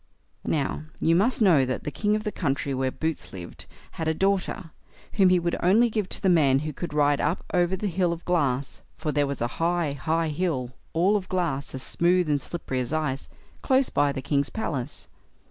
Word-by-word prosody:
Now, 150 0 -1
you 165 - +3
must 220 +5 +2
know 165 -9 +6
that 130 0 -2
the 150 - -3
king 210 +5 +1
of 215 - -2
the 210 - -2
country 140 -5 -1
where 130 0 0
Boots 160 +3 -3
lived 90 -2 -7 0.2
had 160 - -4
a 160 - +1
daughter, 190 -2 0 0.4
whom 195 -3 +5
he 180 - +5
would 170 0 0
only 220 +6 +4
give 210 -3 -1
to - - -3
the - - +3
man 150 -7 +5
who 155 - -3
could 170 +5 -5
ride 145 -1 +2
up 160 +5 -1
over 175 0 +2
the 190 - -4
hill 180 -2 +1
of 170 0 -6
glass, 140 -7 0 0.2
for 155 -1 -2
there 145 0 +1
was 140 -3 -4
a 120 - +2
high, 170 -2 +1
high 160 +3 0
hill, 150 -6 -1 0.2
all 185 +6 +3
of 195 -3 -2
glass, 140 -8 -1
as 130 - -5
smooth 175 0 +2
and 145 -2 +1
slippery 135 -4 -4
as 125 0 -2
ice, 150 -4 -2 0.3
close 265 -1 +3
by 145 -1 +2
the 135 -1 -5
king's 140 0 +1
palace. 145 - -4
160 Hz, 210 wpm, -26 LUFS, 140-185 Hz, 0.4 s, know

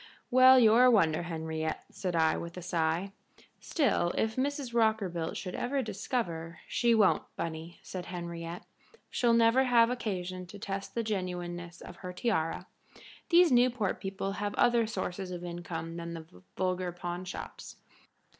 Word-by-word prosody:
"Well, 255 +1 +8
you're 235 +1 +6
a - - +7
wonder, 165 -10 +3
Henriette," 160 -2 -3
said 180 -3 -3
I, 160 -1 +3
with 170 +1 -6
a - - -5
sigh. 170 +2 0 0.5
"Still, 255 - +1
if 220 0 0
Mrs. 275 -2 -2
Rockerbilt 205 -8 +1
should 180 -2 -5
ever 270 +1 -1
discover 180 -6 -3
" - - -26
"She 235 -1 +4
won't, 210 -4 +4
Bunny," 165 +1 -5
said 180 -2 -6
Henriette. 170 -1 -6 0.5
"She'll 240 -1 +2
never 230 +3 +5
have 235 -1 +5
occasion 185 -6 -4
to 190 - -10
test 195 0 -5
the 230 - 0
genuineness 175 -4 -4
of 175 - -10
her 180 -1 -7
tiara. 180 -5 -1 0.6
These 345 -2 +6
Newport 245 -5 +2
people 195 0 -3
have 205 +1 -3
other 235 -2 +3
sources 190 -2 -4
of 175 -1 -6
income 170 -1 -5
than 170 0 -5
the 160 -1 -8 0.3
vulgar 185 -1 -1
pawnshops." 175 +1 -6
185 Hz, 150 wpm, -30 LUFS, 170-230 Hz, 0.6 s, Well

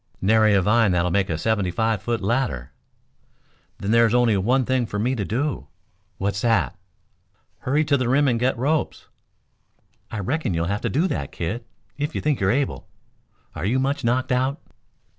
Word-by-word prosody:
"Nary 110 +1 +4
a 95 - +3
vine 105 0 +3
that'll 90 0 +1
make 100 +1 +1
a 80 - -1
seventy 105 +1 0
five 110 +3 0
foot 115 +1 -2
ladder." 100 - -1 1.1
"Then 100 - -3
there 115 0 +5
is 110 - 0
only 120 -3 +4
one 125 +7 +2
thing 130 -2 0
for 105 - -4
me 120 +5 0
to 110 -6 -2
do." 120 - -2 0.5
"What's 100 +1 -2
that?" 115 -5 +1 0.8
"Hurry 145 +4 +1
to 145 -1 +3
the 130 -2 -1
rim 140 +3 +3
and 120 -3 +1
get 125 +1 +1
ropes." 145 +5 -1 1.0
"I - - -5
reckon 115 - -1
you'll 85 0 0
have 100 +5 -2
to - - -1
do 160 +8 +1
that, 70 -2 -3
kid, 110 +8 -4 0.3
if 150 +2 -2
you - - 0
think 150 -3 0
you're 95 - +1
able. 135 +5 -1 0.7
Are - - -6
you 110 +7 +1
much 140 +2 -1
knocked 125 +3 0
out?" 130 +4 +1
115 Hz, 185 wpm, -23 LUFS, 100-130 Hz, 1.1 s, there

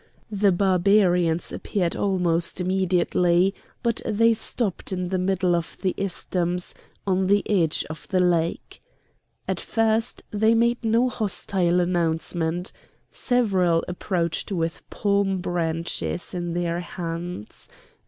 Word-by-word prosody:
The 205 -1 +3
Barbarians 180 -2 +3
appeared 180 -5 -2
almost 180 -3 0
immediately; 180 0 +2 0.3
but 235 -1 0
they 230 +1 +3
stopped 215 -3 -2
in 180 -1 -2
the 185 0 0
middle 185 -1 +1
of 170 -1 -4
the 185 - +1
isthmus, 180 -2 -2 0.3
on 190 -1 +1
the 200 +1 +2
edge 170 -7 +2
of 155 +1 -9
the 185 - +1
lake. 170 -2 0 0.7
At - - -1
first 225 +1 0
they 220 +2 +3
made 235 +1 +2
no 230 +3 +3
hostile 190 -6 0
announcement. 170 0 -1 0.4
Several 190 -9 +2
approached 180 -1 -2
with 165 -3 -2
palm 200 -1 +1
branches 170 0 -2
in 175 -1 -3
their 170 -1 -1
hands. 170 - -6
180 Hz, 115 wpm, -24 LUFS, 170-200 Hz, 0.7 s, The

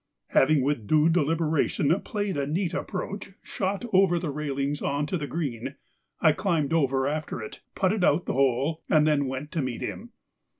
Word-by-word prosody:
Having 140 0 +4
with 130 -6 -1
due 155 +1 +4
deliberation 160 -2 +2
played 205 -3 -3
a 140 -1 -1
neat 170 +3 -1
approach 195 +1 -4
shot 200 +4 -2
over 185 -2 +5
the 170 -3 -2
railings 140 0 -2
on 145 +1 0
to 150 - -3
the 150 -4 -3
green, 135 -5 -4 0.4
I 160 - +5
climbed 165 -3 0
over 135 -4 +2
after 150 -2 -3
it, 110 - -8
putted 190 +1 +1
out 170 +1 +3
the - - -2
hole, 135 +4 +1
and 155 -1 +5
then 145 -3 +2
went 130 +3 -5
to 165 - -1
meet 130 -3 -4
him. 235 - -5
150 Hz, 175 wpm, -26 LUFS, 140-175 Hz, 0.4 s, over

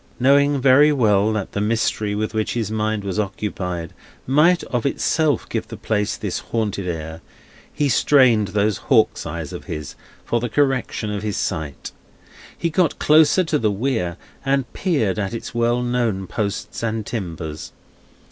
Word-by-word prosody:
Knowing 140 +2 +4
very 140 +3 +6
well 110 -6 +3
that 105 -3 -3
the 100 - -2
mystery 105 -1 0
with 110 +1 -2
which 110 +1 -1
his 115 -2 -2
mind 110 -1 -1
was 100 +1 -3
occupied, 90 -4 -3 0.3
might 155 +7 +4
of 120 -2 -2
itself 145 0 +1
give - - -3
the - - -8
place 105 0 -1
this 100 -5 -3
haunted 105 -4 -3
air, 80 -1 -5 0.5
he 145 - 0
strained 125 -5 +4
those 105 +1 0
hawk's - - +2
eyes - - -5
of - - -8
his 75 -2 -6 0.3
for 120 - 0
the 120 +1 -3
correction 130 -5 0
of 105 -1 -3
his 105 -2 -3
sight. 80 -7 -3 0.7
He 170 - -1
got 170 -2 +1
closer 155 +4 +5
to 155 -3 0
the 110 - +2
Weir, 100 -5 -1 0.3
and 135 -3 0
peered 115 - 0
at 100 +2 -2
its 115 - -7
well 120 +1 +1
known 120 -6 0
posts 100 +1 -4
and 110 -2 -2
timbers. 85 -8 -5
110 Hz, 160 wpm, -21 LUFS, 100-135 Hz, 0.7 s, very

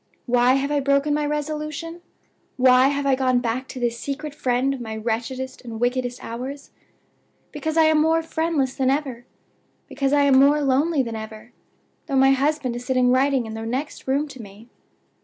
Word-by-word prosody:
"Why 245 0 +3
have 275 +1 -1
I 290 - +2
broken 280 +1 +1
my 295 0 0
resolution? 305 +3 -4 0.6
Why 255 0 +5
have 285 0 -1
I 275 - +3
gone 255 -1 +2
back 245 +2 -2
to 260 - -8
this 235 -1 -1
secret 290 +2 -5
friend 260 -1 0
of 265 - -7
my 220 -2 -5
wretchedest 240 +4 -4
and 230 -3 -8
wickedest 245 0 -1
hours? 260 +5 -7 0.8
Because 315 +2 -3
I 325 - +6
am 315 -1 +4
more 325 +1 +2
friendless 320 -5 -1
than 260 -2 0
ever; 265 -4 -2 0.6
because 275 -1 -1
I 290 0 +4
am 270 -2 +5
more 285 +2 +5
lonely 280 +2 +2
than 230 -2 -5
ever, 220 +1 -9 0.6
though 275 - -2
my 270 0 +5
husband 270 -2 0
is 240 - -6
sitting 255 -1 +2
writing 265 -1 +2
in 220 - -7
the 225 0 -6
next 260 +7 -4
room 280 +3 0
to 260 -3 -10
me. 210 +3 -14
265 Hz, 185 wpm, -23 LUFS, 245-290 Hz, 0.8 s, I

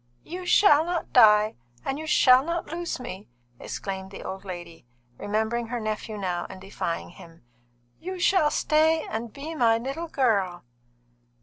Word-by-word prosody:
"You 360 +2 -7
shall 320 -6 +6
not 345 0 -3
die, 215 - +6 0.3
and 270 +2 -2
you 315 - -6
shall 255 -3 +6
not 335 +2 -2
lose 340 -2 -4
me!" 210 -6 -8 0.3
exclaimed 190 -1 -5
the 195 - -9
old 190 +1 -6
lady, 175 -7 -9 0.3
remembering 220 +3 -1
her 240 +1 -3
nephew 215 0 -4
now 180 -3 -3
and 190 - -9
defying 190 -3 -4
him. 165 -3 -15 0.6
"You 370 +2 -6
shall 355 -4 +3
stay 310 +1 +2
and 225 +1 -4
be 295 +6 -7
my 230 -7 +3
little 275 +8 -4
girl." 200 - 0
235 Hz, 150 wpm, -26 LUFS, 195-315 Hz, 0.6 s, shall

